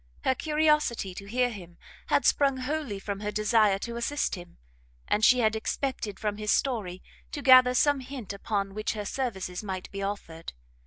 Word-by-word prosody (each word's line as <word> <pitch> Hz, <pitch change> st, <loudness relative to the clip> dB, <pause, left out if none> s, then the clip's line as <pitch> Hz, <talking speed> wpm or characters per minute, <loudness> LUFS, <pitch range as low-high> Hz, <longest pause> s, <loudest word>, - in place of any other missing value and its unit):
Her 260 Hz, -, +3 dB
curiosity 300 Hz, -, +1 dB
to 200 Hz, +2 st, -9 dB
hear 245 Hz, +3 st, +1 dB
him 175 Hz, -5 st, -11 dB, 0.3 s
had -, -, +2 dB
sprung 275 Hz, -2 st, +3 dB
wholly 265 Hz, -4 st, -3 dB
from 200 Hz, 0 st, -5 dB
her 210 Hz, 0 st, -3 dB
desire 215 Hz, -1 st, +3 dB
to 235 Hz, 0 st, -6 dB
assist 290 Hz, +5 st, -1 dB
him, 175 Hz, -2 st, -8 dB, 0.5 s
and 210 Hz, +1 st, +1 dB
she 250 Hz, +2 st, +6 dB
had 220 Hz, -1 st, +2 dB
expected 220 Hz, -3 st, -3 dB
from 210 Hz, -1 st, -2 dB
his 210 Hz, -1 st, -1 dB
story 205 Hz, -9 st, -1 dB, 0.3 s
to 290 Hz, -, -5 dB
gather 255 Hz, -1 st, +7 dB
some 290 Hz, +2 st, +3 dB
hint 255 Hz, -6 st, -7 dB
upon 200 Hz, -1 st, -2 dB
which 215 Hz, +1 st, -2 dB
her 210 Hz, -2 st, -5 dB
services 195 Hz, -7 st, -3 dB
might 190 Hz, -3 st, -5 dB
be 195 Hz, -, -5 dB
offered. 195 Hz, -5 st, -5 dB
215 Hz, 175 wpm, -28 LUFS, 200-255 Hz, 0.5 s, gather